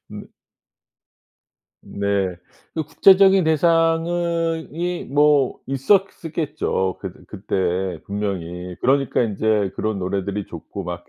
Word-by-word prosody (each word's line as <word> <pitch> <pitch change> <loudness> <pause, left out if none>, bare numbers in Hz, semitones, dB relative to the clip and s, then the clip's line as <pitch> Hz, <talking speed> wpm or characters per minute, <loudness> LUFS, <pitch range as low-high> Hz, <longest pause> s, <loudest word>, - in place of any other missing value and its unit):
음. - - -8 1.6
네. 100 -2 -1 0.4
그 160 - -1
구체적인 190 +4 +5
대상은 165 +1 +1
이 175 +2 -2
뭐 145 -2 +3
있었었겠죠. 150 - 0
그 95 -3 -5
그때 95 -3 -2
분명히. 90 -3 -4
그러니까 135 0 +2
인제 105 -2 0
그런 110 -1 -2
노래들이 100 +2 -3
좋고 90 +4 -8
막 90 0 -6
125 Hz, 205 characters per minute, -21 LUFS, -, 1.6 s, 구체적인